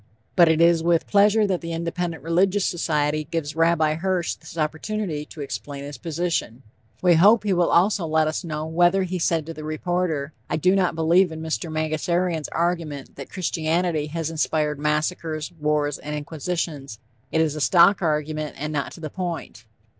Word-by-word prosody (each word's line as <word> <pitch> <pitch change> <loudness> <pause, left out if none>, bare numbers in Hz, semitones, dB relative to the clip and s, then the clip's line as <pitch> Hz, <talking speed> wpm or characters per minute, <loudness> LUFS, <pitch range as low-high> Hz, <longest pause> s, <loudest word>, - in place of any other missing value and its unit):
But 170 -2 +6
it 160 0 +3
is 170 -1 +5
with 170 0 +2
pleasure 210 +1 +4
that 190 -3 -1
the 165 -1 -5
Independent 170 -2 -3
Religious 185 +4 +2
Society 155 -3 0
gives 160 -3 -3
Rabbi 165 -2 +3
Hirsch 175 +1 -1
this 160 +1 -12
opportunity 160 +1 -2
to 150 - -10
explain 140 0 -6
his 145 0 -8
position. 165 -7 -2 0.4
We 180 -1 +6
hope 205 +7 +6
he 205 -2 +1
will 175 -1 +2
also 180 0 +3
let 155 0 +2
us 155 +4 -2
know 155 -2 -4
whether 175 +4 +3
he 185 0 -3
said 165 -2 +1
to 165 - -6
the 155 - -9
reporter: 155 -2 -2 0.2
"I - - 0
do 185 +5 +3
not 180 -4 +1
believe 170 +3 +3
in 160 0 -7
Mr. 160 +1 -3
Mangasarian's 160 +1 -1
argument 165 -5 -2
that 140 - -8
Christianity 165 -2 -1
has 165 +1 -3
inspired 150 -2 0
massacres, 155 +1 -1
wars 150 -1 0
and 150 0 -5
inquisitions. 150 -4 -4 0.3
It 160 - +1
is 155 -2 +1
a 155 - -4
stock 180 +6 +5
argument 155 -2 -1
and 150 +2 -4
not 140 -2 -2
to 165 - -12
the 155 -2 -5
point." 170 - -5
160 Hz, 175 wpm, -23 LUFS, 150-175 Hz, 0.4 s, But